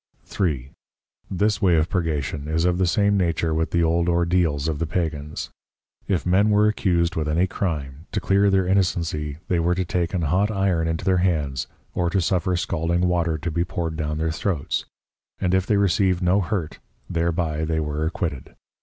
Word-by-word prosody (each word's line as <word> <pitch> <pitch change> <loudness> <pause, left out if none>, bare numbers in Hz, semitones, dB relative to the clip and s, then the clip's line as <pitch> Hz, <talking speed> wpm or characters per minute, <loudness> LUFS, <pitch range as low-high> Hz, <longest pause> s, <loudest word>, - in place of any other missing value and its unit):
3. 70 -9 -2 0.6
This 100 +1 0
way 90 -3 +4
of 80 0 +2
Purgation 75 -5 -2
is 80 +2 0
of 90 0 +1
the 95 - +3
same 100 +3 +2
nature 85 -3 0
with 80 +1 0
the 85 -1 +1
old 85 +1 +2
Ordeals 85 -4 +1
of 75 -2 -2
the 85 - -1
Pagans. 75 -3 -3 0.6
If 90 -6 0
Men 95 +4 +3
were 105 0 +4
accused 90 -5 +1
with 80 -1 -1
any 85 +4 +2
Crime, 80 -5 -4
to 105 - -1
clear 100 +1 +3
their 95 -1 +2
innocency, 85 -6 0
they 90 - +1
were 85 +2 +2
to 95 0 -1
take 85 +1 -1
an 85 - 0
hot 90 +7 +2
Iron 95 -5 +1
into 80 0 -2
their 95 -1 +3
Hands, 75 -8 0 0.3
or 85 -1 0
to 95 - +1
suffer 90 0 +1
scalding 85 0 -1
Water 85 -3 +1
to 80 +3 -4
be 85 +2 0
poured 85 -3 -3
down 75 -1 -2
their 80 0 0
Throats, 80 -3 -2 0.5
and 90 -2 0
if 95 0 +2
they 105 - +3
received 95 -2 +2
no 95 +3 +3
hurt 90 -5 -3 0.3
thereby 85 -2 -1
they 80 0 0
were 75 0 -2
acquitted. 80 - -3
85 Hz, 190 wpm, -23 LUFS, 80-95 Hz, 0.6 s, way